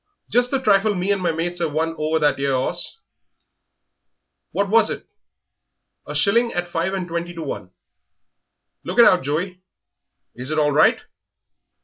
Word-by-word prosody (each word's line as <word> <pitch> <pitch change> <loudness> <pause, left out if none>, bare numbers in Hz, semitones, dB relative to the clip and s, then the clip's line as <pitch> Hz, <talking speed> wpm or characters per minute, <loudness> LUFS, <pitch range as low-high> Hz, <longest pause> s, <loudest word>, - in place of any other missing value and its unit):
"Just 245 +1 +3
the 275 - +1
trifle 210 -3 +3
me 185 +2 -1
and 200 -2 0
my 175 -2 +1
mates 175 +2 -3
'av 160 -3 -1
won 160 +1 0
over 155 0 0
that 150 -3 +1
'ere 140 -1 0
'orse." 130 - -1 1.5
"What 200 0 0
was 220 +1 +4
it?" - - -6 1.0
"A - - -6
shilling 235 +4 +3
at 175 0 -2
five 175 +3 -2
and 185 -2 -4
twenty 170 +1 -4
to 165 - -5
one." 100 -10 -6 1.1
"Look - - -5
it - - +8
out, - - +5
Joey. 175 +7 -3 0.7
Is 125 +3 -6
it 155 - -2
all 150 -1 +3
right?" 145 - +4
175 Hz, 160 wpm, -21 LUFS, 155-195 Hz, 1.5 s, it